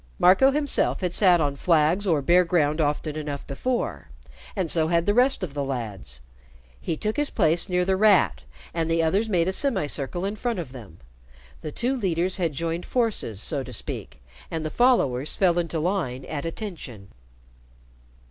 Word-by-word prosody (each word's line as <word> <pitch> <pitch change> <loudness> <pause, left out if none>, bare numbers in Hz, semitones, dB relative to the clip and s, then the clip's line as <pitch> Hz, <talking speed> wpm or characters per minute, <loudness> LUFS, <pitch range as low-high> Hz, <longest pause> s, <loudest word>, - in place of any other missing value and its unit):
Marco 190 +9 +6
himself 285 -5 +1
had 180 -2 -1
sat 180 -4 +5
on 145 -3 0
flags 165 +5 +2
or 155 -6 +2
bare 175 +4 +5
ground 160 -3 +1
often 150 +1 -1
enough 145 -2 -5
before, 240 - -3 0.5
and 185 -6 0
so 160 -2 +2
had 170 0 +1
the 205 - +2
rest 250 -1 +2
of 160 -7 -4
the 145 -1 -2
lads. 105 - -5 0.6
He 160 - -3
took 215 +5 -2
his 295 -1 +1
place 165 +4 +1
near 180 0 +1
The 190 0 +2
Rat, 190 - +4 0.3
and 165 -1 -1
the 165 0 +2
others 195 +7 +1
made 175 -4 +2
a 190 - 0
semicircle 175 - -1
in 205 +2 -3
front 235 0 -2
of 160 -8 -5
them. 110 -10 -12 0.6
The 155 - -5
two 250 - -1
leaders 185 -5 0
had 170 -5 -1
joined 165 +3 -3
forces, 220 - -1
so 145 -4 -2
to 130 -1 -8
speak, 105 - -6 0.3
and 160 -1 -4
the 155 - -3
followers 150 - +2
fell 175 -3 +2
into 165 -1 -2
line 155 -7 -2
at 150 0 -5
"attention." 165 - -7
170 Hz, 175 wpm, -25 LUFS, 145-195 Hz, 0.6 s, Marco